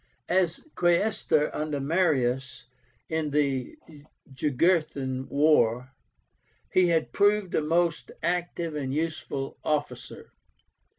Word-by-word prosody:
As 180 - +1
Quaestor 175 -3 +1
under 150 -1 -2
Marius 135 -5 0 0.4
in 160 -1 -1
the 140 -3 -1 0.6
Jugurthine 140 -2 0
War, 130 -4 +2 0.8
he 185 -1 +5
had 165 -2 0
proved 205 -2 +2
a - - +2
most 165 +1 0
active 170 -1 -2
and 140 -3 -3
useful 150 -3 -3
officer." 150 -1 -3
155 Hz, 95 wpm, -27 LUFS, 135-175 Hz, 0.8 s, he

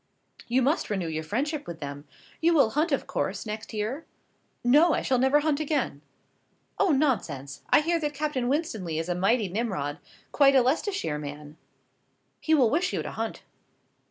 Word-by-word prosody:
"You 250 +2 +2
must 290 +6 +1
renew 190 -5 -1
your 160 -1 -3
friendship 285 - -2
with 170 -1 -7
them. 145 0 -7 0.4
You 335 +1 +4
will 270 -8 +4
hunt, 305 +5 +1
of 275 - 0
course, - - -3
next 215 0 -6
year?" 220 +8 -3 0.6
"No, 300 +7 +5
I - - -2
shall 255 -2 +1
never 265 +3 +4
hunt 300 -1 +1
again!" 285 - -1 0.8
"Oh, - - +3
nonsense; 190 - 0
I - - +6
hear 335 +2 +1
that 295 -2 -3
Captain 280 -4 -1
Winstanley 220 - -1
is 165 +2 -3
a - - +2
mighty 200 +5 +2
Nimrod 180 -8 -3 0.3
quite 275 -1 +5
a 260 - +6
Leicestershire 275 - -1
man. 145 +1 -8 0.8
He 315 - +2
will 255 -7 +4
wish 350 +6 +1
you - - -1
to - - -5
hunt." - - -4
250 Hz, 175 wpm, -27 LUFS, -, 0.8 s, I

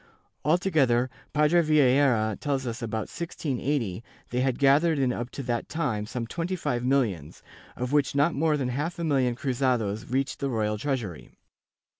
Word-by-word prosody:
Alto 175 +6 +2
gether, 130 -5 +3 0.2
Padre 150 +3 +4
Vieira 135 -7 +3
tells 135 -2 -1
us, 120 +1 -4
about 110 -1 -2
1680, 135 - -3 0.3
they 125 +1 0
had 130 -2 +1
gathered 145 +4 +4
in 130 -3 +1
up 120 0 -4
to 140 - -6
that 120 -2 -2
time 120 -11 -2
some 120 0 -4
twenty 170 +9 -3
five 125 -8 -2
millions, 115 - 0 0.3
of 125 +1 -3
which 145 -1 +2
not 145 +4 +3
more 155 +1 +1
than 130 -3 -1
half 150 +7 -3
a 170 - -3
million 135 -6 +1
cruzados 120 -5 -1
reached 135 +1 -1
the 140 - -1
royal 105 -3 -1
treasury. 120 - -3
130 Hz, 165 wpm, -27 LUFS, 120-150 Hz, 0.3 s, Padre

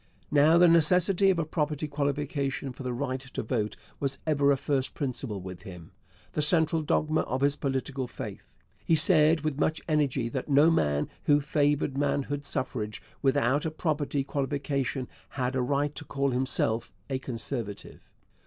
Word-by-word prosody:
Now, 150 +3 +5
the 175 +1 +7
necessity 180 +4 +4
of 190 - +3
a 165 - 0
property 150 -1 -2
qualification 140 -2 -2
for 130 - -11
the 125 -1 -3
right 130 +1 -2
to 130 -2 -6
vote 110 -2 -2 0.2
was 140 -1 -1
ever 145 -2 +3
a 140 - +3
first 135 -1 -1
principle 125 -6 -3
with 90 -1 -8
him 90 -5 -11 0.4
the - - -1
central 160 +1 +4
dogma 155 +1 +1
of 130 +2 -3
his 140 0 +3
political 135 -1 -2
faith. 110 -5 -9 0.3
He 165 - +3
said 160 -1 +4
with 150 -2 -2
much 160 0 +1
energy 145 -6 +1
that 130 +4 -4
no 145 +4 +6
man 75 - +1 0.2
who 145 0 +5
favoured 145 -1 +1
manhood 145 0 -1
suffrage 110 -6 -3 0.2
without 135 +1 +2
a 160 - -1
property 150 -3 -1
qualification 140 -1 -2 0.3
had 130 0 -1
a 130 - +1
right 140 +3 0
to 130 - -7
call 140 0 -1
himself 125 -3 0 0.2
a 135 -2 -2
Conservative. 115 -4 -5
140 Hz, 160 wpm, -28 LUFS, 130-150 Hz, 0.4 s, the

